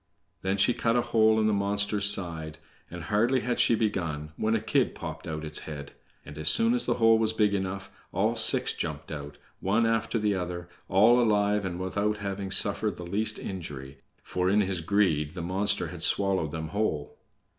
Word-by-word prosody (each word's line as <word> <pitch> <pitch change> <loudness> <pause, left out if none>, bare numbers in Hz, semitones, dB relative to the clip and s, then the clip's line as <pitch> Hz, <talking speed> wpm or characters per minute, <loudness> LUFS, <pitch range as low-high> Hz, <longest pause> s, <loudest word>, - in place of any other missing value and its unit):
Then 95 +1 -1
she 100 +5 +3
cut 115 0 0
a 120 - +2
hole 110 -1 +3
in 110 - +1
the 110 - +2
monster's 100 0 +4
side, 80 -5 -4 0.3
and, 90 -1 -8
hardly 115 +9 +1
had 120 0 -2
she 115 - +4
begun, 85 -9 -2
when 110 +5 0
a - - +1
kid 110 - 0
popped 80 +1 -7
out 80 -1 -5
its 75 0 -1
head, 70 -2 -8 0.3
and 75 +1 -10
as 75 - +3
soon 230 +1 +4
as 245 - 0
the - - +1
hole 115 -1 +4
was 110 0 +1
big 105 -2 +1
enough, 95 0 -4 0.2
all 105 +5 0
six 115 - +4
jumped - - -5
out, 75 -1 -7 0.2
one 105 +5 +1
after 115 +1 0
the 105 -2 0
other, 90 -2 -4 0.2
all 115 +6 +5
alive, 105 -2 +1
and 90 -1 -4
without 100 +3 -1
having 100 -1 -5
suffered 100 0 0
the 90 - -7
least 105 +5 -1
injury, 70 -7 -7 0.2
for, 90 0 -1
in 105 +2 +3
his 95 -3 -2
greed, 80 -4 0
the 85 - -5
monster 95 +4 0
had - - -9
swallowed 95 -5 +2
them 80 +1 -5
whole. 80 -7 -2
100 Hz, 195 wpm, -27 LUFS, 85-110 Hz, 0.3 s, all